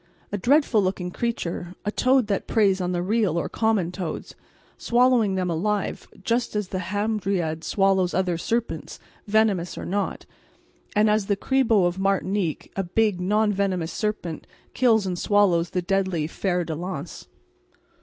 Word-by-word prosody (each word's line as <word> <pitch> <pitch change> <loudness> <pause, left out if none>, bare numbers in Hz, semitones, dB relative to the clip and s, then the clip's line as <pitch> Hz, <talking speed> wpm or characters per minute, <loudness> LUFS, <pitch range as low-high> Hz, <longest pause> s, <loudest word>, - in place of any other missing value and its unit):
A 205 - -1
dreadful 265 -1 +3
looking 185 -1 -2
creature, 180 -6 -3
a 205 - 0
toad 255 +2 +3
that 200 -2 -2
preys 195 -4 +2
on 180 0 -1
the 175 -1 -1
real 200 -4 +1
or 160 - -1
common 215 -6 0
toads, 180 -2 -5 0.4
swallowing 240 -4 +3
them 185 -1 0
alive 205 +5 -2 0.2
just 235 +1 0
as 210 -3 -1
the 185 - -3
hamadryad 190 -4 -1
swallows 195 -2 +2
other 185 -2 +1
serpents, 230 +7 -3 0.3
venomous 205 -5 +1
or - - -5
not, 200 +2 -2 0.7
and 210 +1 +4
as 210 -1 +2
the 200 - +1
Cribo 230 -5 +2
of 175 +2 -1
Martinique, 195 -3 -1
a 195 - 0
big 200 +1 +1
non 210 +3 +2
venomous 185 -4 -1
serpent, 210 -7 -3 0.3
kills 225 -5 +3
and 180 -2 -2
swallows 185 -5 +3
the 180 - -2
deadly 190 -4 0
fer 180 +2 -1
de 160 - -4
lance. 170 -1 -6
195 Hz, 155 wpm, -24 LUFS, 180-215 Hz, 0.7 s, and